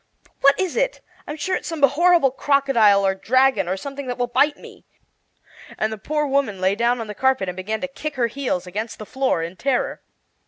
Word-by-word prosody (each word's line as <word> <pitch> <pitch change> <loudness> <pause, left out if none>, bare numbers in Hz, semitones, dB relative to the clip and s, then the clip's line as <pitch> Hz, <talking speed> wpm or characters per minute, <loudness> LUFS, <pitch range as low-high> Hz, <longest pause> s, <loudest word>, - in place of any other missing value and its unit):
"What 280 0 +4
is 375 -2 -1
it? - - 0 0.3
I'm 295 - -5
sure 370 +5 -2
it's - - -5
some 325 -4 -4
horrible 315 +1 +4
crocodile, 250 -8 +3
or 190 - +2
dragon, 230 0 +2
or 185 +2 -1
something 280 +4 -7
that 245 - -3
will 245 - 0
bite 290 +5 +2
me!" - - -14 0.9
And 220 0 -1
the 220 - -8
poor 300 +6 -1
woman 270 -8 0
lay 190 +1 +2
down 235 +3 +1
on 225 - -4
the 210 - -7
carpet 265 -3 +1
and 180 - -4
began 210 +4 -4
to 275 - -2
kick 290 +2 -6
her 245 -3 +1
heels 235 -7 -2
against 210 +5 -5
the 215 - -8
floor 260 -9 -1
in 170 +3 -7
terror. 265 -2 -1
255 Hz, 210 wpm, -22 LUFS, 210-280 Hz, 0.9 s, What